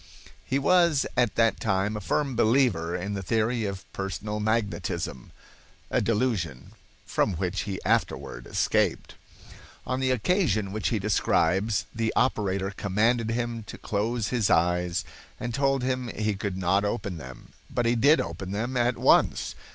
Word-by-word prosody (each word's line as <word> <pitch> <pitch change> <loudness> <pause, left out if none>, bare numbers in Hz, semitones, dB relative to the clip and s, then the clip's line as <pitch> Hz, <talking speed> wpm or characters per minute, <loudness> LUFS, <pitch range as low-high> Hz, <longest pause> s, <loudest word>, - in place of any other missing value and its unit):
He 135 - 0
was 170 0 +3
at 120 -5 +2
that 115 -3 +3
time 100 0 0
a 105 - -4
firm 135 - -1
believer 110 -8 +2
in 95 +3 -3
the 100 - -3
theory 110 +4 0
of 100 -1 -5
personal 100 +2 -4
magnetism 105 - -2 0.6
(a - - +2
delusion 105 - -1 0.3
from 105 - +1
which 90 +3 -2
he 95 - -3
afterward - - -1
escaped). - - 0 0.7
On 130 0 -1
the 130 0 +1
occasion 125 - +1
which 110 +1 -2
he 115 - +1
describes, 100 0 +1
the 115 -1 0
operator 100 -6 +1
commanded 110 +4 +1
him 120 0 -2
to - - -9
close 110 +2 -1
his 120 -5 +1
eyes 90 -1 +2 0.3
and 120 - -4
told 135 0 +1
him 130 -1 -1
he 110 -2 -1
could 100 -1 -4
not 95 +2 +2
open 100 -3 -2
them, 65 -4 -11 0.2
but 120 - -1
he 115 - +3
did 140 +7 +5
open 85 +3 -4
them 120 +5 -2
at 120 0 +1
once. - - +3
110 Hz, 150 wpm, -27 LUFS, 95-120 Hz, 0.7 s, did